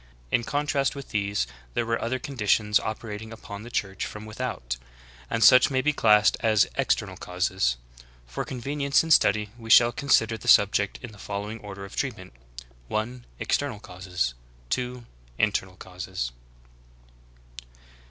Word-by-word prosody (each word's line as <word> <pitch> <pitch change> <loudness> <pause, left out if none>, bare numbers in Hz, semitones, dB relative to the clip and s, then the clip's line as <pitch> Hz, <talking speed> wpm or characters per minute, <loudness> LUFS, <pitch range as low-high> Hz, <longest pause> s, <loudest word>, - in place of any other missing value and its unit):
In 120 - +2
contrast 145 0 0
with 140 -1 -8
these 100 -7 0 0.3
there 120 - +1
were 115 0 -1
other 120 +3 -1
conditions 105 -5 +1
operating 110 0 -6
upon 105 -2 -8
the 120 - -9
Church 95 -5 -2
from 105 0 -6
without; 110 - -4 0.5
and 115 0 +1
such 125 +3 +8
may 130 -2 +1
be 150 +3 +2
classed 105 -4 +4
as 110 -2 +3
external - - 0
causes. 90 -8 0 0.5
For - - -4
convenience 140 +3 0
in 165 - -4
study 105 -7 +4
we 115 -1 -10
shall 120 +1 +7
consider 115 -4 +2
the - - -10
subject 100 0 +4
in 125 - -7
the 105 - -15
fol 100 +1 -4
lowing 110 +2 -6
order 100 -2 -8
of 100 - -11
treatment: - - -4 0.5
(1). 120 - -3
External 140 -7 -1
causes; 90 -8 -3 0.4
(2) 125 -1 -2 0.3
In 110 - +3
ternal 95 -2 -3
causes. 90 -9 -5
110 Hz, 150 wpm, -26 LUFS, 100-125 Hz, 0.5 s, such